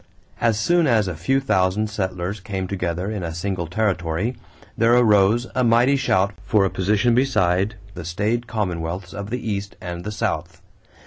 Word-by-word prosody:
As 115 Hz, -3 st, +2 dB
soon 170 Hz, +8 st, +3 dB
as 110 Hz, -6 st, +3 dB
a 90 Hz, -, -2 dB
few 135 Hz, -, +1 dB
thousand 100 Hz, -5 st, +1 dB
settlers 95 Hz, -2 st, -3 dB
came 95 Hz, -1 st, -4 dB
together 90 Hz, 0 st, -2 dB
in 105 Hz, -3 st, -3 dB
a 85 Hz, -2 st, -4 dB
single 90 Hz, -1 st, -3 dB
territory, 95 Hz, +2 st, -1 dB, 0.4 s
there 115 Hz, +1 st, +4 dB
arose 110 Hz, 0 st, +4 dB
a 130 Hz, -, +1 dB
mighty 120 Hz, +4 st, +4 dB
shout 100 Hz, -7 st, +1 dB
for 105 Hz, -2 st, +3 dB
a 95 Hz, -, -1 dB
position 105 Hz, +5 st, +2 dB
beside 105 Hz, -6 st, +2 dB, 0.2 s
the 85 Hz, -, -7 dB
staid 105 Hz, +8 st, -1 dB
commonwealths 90 Hz, -4 st, -3 dB
of 100 Hz, 0 st, -6 dB
the 125 Hz, 0 st, -4 dB
East 100 Hz, -1 st, -3 dB
and 85 Hz, 0 st, -6 dB
the 105 Hz, -, -4 dB
South. 105 Hz, -, -3 dB
100 Hz, 170 wpm, -22 LUFS, 90-115 Hz, 0.4 s, there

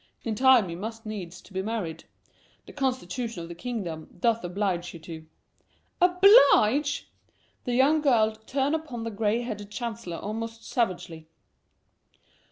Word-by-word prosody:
In 225 Hz, -, -2 dB
time 250 Hz, -2 st, +5 dB
you 170 Hz, -, -6 dB
must 225 Hz, +4 st, -6 dB
needs 185 Hz, -5 st, -7 dB
be 190 Hz, -1 st, -3 dB
married. 190 Hz, -7 st, -4 dB, 0.6 s
The -, -, -12 dB
constitution 250 Hz, -7 st, -2 dB
of 165 Hz, -, -9 dB
the -, -, -6 dB
kingdom 175 Hz, -5 st, -5 dB
doth 230 Hz, +3 st, +1 dB
oblige 175 Hz, -1 st, -2 dB
you -, -, -9 dB
to." 160 Hz, -1 st, -9 dB, 0.7 s
"Oblige!" 355 Hz, -, +5 dB, 0.5 s
and -, -, -42 dB
the 245 Hz, -2 st, -1 dB
young 295 Hz, +4 st, +4 dB
girl 225 Hz, -7 st, +3 dB
turned 275 Hz, +2 st, 0 dB
upon 300 Hz, -8 st, -4 dB
the 230 Hz, -, -4 dB
gray 215 Hz, +2 st, 0 dB
headed 210 Hz, -4 st, -6 dB
chancellor 225 Hz, -5 st, -5 dB
almost 225 Hz, +2 st, -5 dB
savagely. 180 Hz, -, -2 dB
225 Hz, 140 wpm, -27 LUFS, 180-250 Hz, 0.7 s, time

